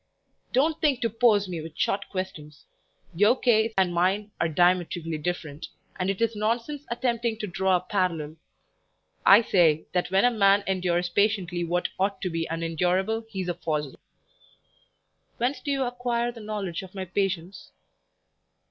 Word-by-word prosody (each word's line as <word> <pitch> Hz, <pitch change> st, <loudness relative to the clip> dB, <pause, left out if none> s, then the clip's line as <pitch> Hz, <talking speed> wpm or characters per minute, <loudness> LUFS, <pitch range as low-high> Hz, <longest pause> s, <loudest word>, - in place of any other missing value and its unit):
"Don't 305 Hz, +5 st, +1 dB
think 285 Hz, -5 st, +2 dB
to 230 Hz, -2 st, 0 dB
pose 215 Hz, -3 st, +3 dB
me 175 Hz, -3 st, -4 dB
with 160 Hz, 0 st, -10 dB
short 200 Hz, 0 st, -1 dB
questions; 155 Hz, -6 st, -6 dB, 0.5 s
your 210 Hz, +9 st, +3 dB
case 225 Hz, -2 st, +3 dB
and 185 Hz, -2 st, +2 dB
mine 195 Hz, +4 st, +1 dB
are 165 Hz, -, +2 dB
diametrically 175 Hz, -1 st, +1 dB
different, 155 Hz, -2 st, -4 dB, 0.3 s
and 185 Hz, +1 st, 0 dB
it 195 Hz, -, -2 dB
is 230 Hz, -1 st, +1 dB
nonsense 235 Hz, +7 st, -2 dB
attempting 235 Hz, -1 st, -1 dB
to 215 Hz, -, -4 dB
draw 190 Hz, 0 st, +1 dB
a 180 Hz, -, +1 dB
parallel. 170 Hz, -5 st, -2 dB, 0.9 s
I 205 Hz, +4 st, +8 dB
say, 165 Hz, -7 st, +3 dB
that 180 Hz, -1 st, 0 dB
when 195 Hz, +4 st, +3 dB
a 245 Hz, -, +5 dB
man 200 Hz, -2 st, +4 dB
endures 180 Hz, -2 st, 0 dB
patiently 185 Hz, -3 st, +1 dB
what 175 Hz, +1 st, -1 dB
ought 195 Hz, 0 st, 0 dB
to 185 Hz, -, -1 dB
be 165 Hz, 0 st, -2 dB
unendurable, 180 Hz, +7 st, -1 dB
he 195 Hz, -4 st, -4 dB
is 180 Hz, -, -4 dB
a -, -, 0 dB
fossil." 150 Hz, -5 st, -3 dB, 1.4 s
"Whence 255 Hz, +2 st, -1 dB
do 285 Hz, -, -5 dB
you 275 Hz, -1 st, +1 dB
acquire 245 Hz, -1 st, -1 dB
the 235 Hz, -, -12 dB
knowledge 205 Hz, -5 st, -4 dB
of 190 Hz, 0 st, -12 dB
my 190 Hz, -1 st, -4 dB
patience?" 185 Hz, -1 st, -3 dB
190 Hz, 160 wpm, -26 LUFS, 175-225 Hz, 1.4 s, I